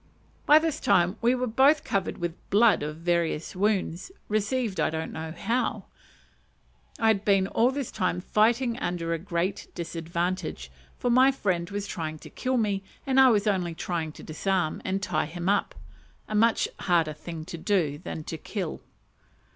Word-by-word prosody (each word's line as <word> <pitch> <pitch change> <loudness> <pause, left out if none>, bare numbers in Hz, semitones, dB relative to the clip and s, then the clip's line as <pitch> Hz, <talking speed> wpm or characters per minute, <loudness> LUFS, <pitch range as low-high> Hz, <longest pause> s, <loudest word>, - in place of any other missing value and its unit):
By 300 - +8
this 315 -1 0
time 180 +2 +3
we 240 +2 +3
were 255 0 -1
both 270 +6 +4
covered 195 -2 -1
with 175 -1 -2 0.2
blood 220 +1 +5
from 150 +1 -4
various 170 -2 0
wounds, 195 - 0 0.2
received 215 0 0
I - - +2
don't 160 0 -4
know 160 0 -5
how. 230 +9 -1 1.1
I 225 - -1
had 205 -2 +2
been 195 -2 +3
all 230 +5 +2
this 270 -1 -3
time 185 -3 -1
fighting 235 +5 +2
under 170 -1 -2
a 165 - -2
great 175 +2 -2
disadvantage, 170 +1 -3 0.3
for 245 - 0
my 260 +2 +6
friend 180 -9 -1
was 200 0 -3
trying 155 -5 -4
to - - -13
kill 255 0 -1
me, 205 -4 0 0.2
and 265 -1 +3
I 265 -1 +8
was 210 -3 +2
only 180 -5 0
trying 165 -2 -3
to - - -12
disarm 175 +1 -1
and 195 +1 -2
tie 155 -5 0
him 175 +2 -5
up 205 +1 +1 0.5
a - - -6
much 225 +2 +3
harder 165 -4 +2
thing 160 +1 -7
than 165 -3 -2
to 160 - -5
kill. 185 -3 -4
190 Hz, 165 wpm, -27 LUFS, 170-225 Hz, 1.1 s, By